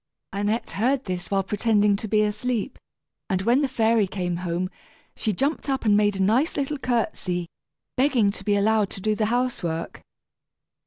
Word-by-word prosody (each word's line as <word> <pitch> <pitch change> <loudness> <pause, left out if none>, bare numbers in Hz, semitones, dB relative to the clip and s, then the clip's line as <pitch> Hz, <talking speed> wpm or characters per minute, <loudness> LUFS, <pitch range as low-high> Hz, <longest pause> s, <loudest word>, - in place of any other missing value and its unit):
Annette 205 +3 -1
heard 255 +6 0
this 180 -2 -4
while 195 -1 +1
pretending 210 +1 +2
to 215 - -5
be 215 0 +3
asleep, 220 +3 -2 0.5
and 190 -1 0
when 240 +6 +3
the 285 - +2
fairy 225 -4 +2
came 180 -2 -2
home, 180 +1 -2 0.4
she 220 - -1
jumped 280 - -1
up 265 -3 -1
and 210 -1 +5
made 205 -1 +3
a 190 - +1
nice 245 - +2
little 285 +1 -1
courtesy, 215 -8 -1 0.5
begging 250 -6 +3
to - - -8
be 205 -1 +2
allowed 210 0 +2
to 195 - -8
do 215 +2 +1
the 215 0 0
housework. 220 -9 -2
215 Hz, 170 wpm, -24 LUFS, 195-245 Hz, 0.5 s, and